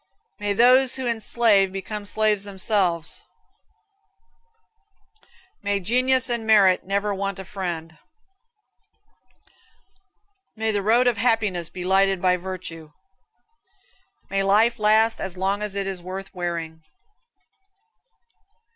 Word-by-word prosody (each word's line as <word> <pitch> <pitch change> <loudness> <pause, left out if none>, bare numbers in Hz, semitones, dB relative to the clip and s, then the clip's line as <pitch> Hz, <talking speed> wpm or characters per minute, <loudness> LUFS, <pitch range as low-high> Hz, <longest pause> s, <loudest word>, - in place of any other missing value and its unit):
May 205 -1 -1
those 250 +4 +4
who 265 - -4
would 240 - 0
enslave 220 -3 +2
become 205 +2 -6
slaves 210 -1 0
themselves. 190 -4 -1 2.4
May 205 0 -1
genius 255 +6 +2
and 235 -3 -3
merit 195 -4 +5
never 200 +2 -1
want 195 0 -3
a 190 - -8
friend. 170 -5 -6 2.6
May 220 0 -1
the 205 -1 -1
road 230 +5 +3
of 245 -3 +2
happiness 210 -7 0
be 180 -1 -7
lighted 195 0 +2
by 180 0 +2
virtue. 175 -4 -8 1.4
May 195 0 +1
life 215 +4 +3
last 220 +2 +3
as 190 -1 -5
long 195 +2 -1
as 210 -2 -4
it 200 -1 -2
is 190 -2 -4
worth 190 +2 -8
wearing. 170 -3 -5
200 Hz, 110 wpm, -23 LUFS, 185-220 Hz, 2.6 s, merit